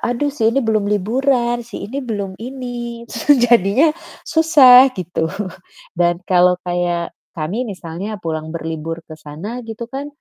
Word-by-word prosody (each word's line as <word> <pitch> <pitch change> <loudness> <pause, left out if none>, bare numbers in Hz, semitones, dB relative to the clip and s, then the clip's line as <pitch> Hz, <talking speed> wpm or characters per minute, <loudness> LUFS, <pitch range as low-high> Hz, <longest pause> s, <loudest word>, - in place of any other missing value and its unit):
"Aduh 270 +4 -1
sih 225 -6 +1
ini 275 +4 +1
belum 215 -2 +1
liburan, 240 +3 +1
si - - -7
ini 260 +7 -5
belum 205 -7 -4
ini." 240 -1 -6
su 290 - +3
jadinya, 240 - +4 0.3
susah 275 -6 +7
gitu. 170 -2 -2 0.7
Dan 175 0 +3
kalau 180 0 +4
kayak 175 -1 -1 0.2
kami 170 +10 -2
misalnya, 190 +2 -6
pulang 160 -1 -3
berlibur 165 0 -5
ke 155 - -8
sana 180 +13 -7
gitu 225 +1 -6
kan, 275 +2 -4
220 Hz, 140 wpm, -18 LUFS, 175-250 Hz, 0.7 s, susah